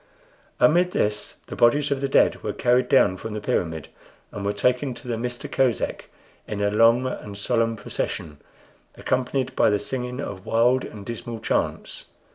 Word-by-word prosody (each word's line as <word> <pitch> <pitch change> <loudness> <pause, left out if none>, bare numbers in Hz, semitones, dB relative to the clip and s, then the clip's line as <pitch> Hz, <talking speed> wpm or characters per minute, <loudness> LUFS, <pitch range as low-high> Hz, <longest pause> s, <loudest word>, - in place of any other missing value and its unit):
Amid 175 +3 +4
this 105 0 -1
the - - -7
bodies 145 +5 +3
of 135 -1 0
the 140 - -1
dead - - +3
were - - -3
carried 125 0 +2
down 100 -8 +4
from 110 +2 -6
the - - -2
pyramid, 80 -6 -2 0.4
and 100 - -6
were 100 - +1
taken 125 +5 0
to - - -11
the 120 - -1
Mista 120 +1 -4
Kosek 130 -3 0 0.4
in 105 - -4
a 100 0 +1
long 115 +4 +4
and 105 -5 -5
solemn 115 +2 +1
procession, 75 -7 -4 0.6
accompanied 130 +1 -1
by - - +4
the 105 - +2
singing 125 +4 -4
of 95 -9 -5
wild 120 +4 +2
and 105 -2 -10
dismal 115 0 -5
chants. - - -2
120 Hz, 170 wpm, -24 LUFS, 105-130 Hz, 0.6 s, Amid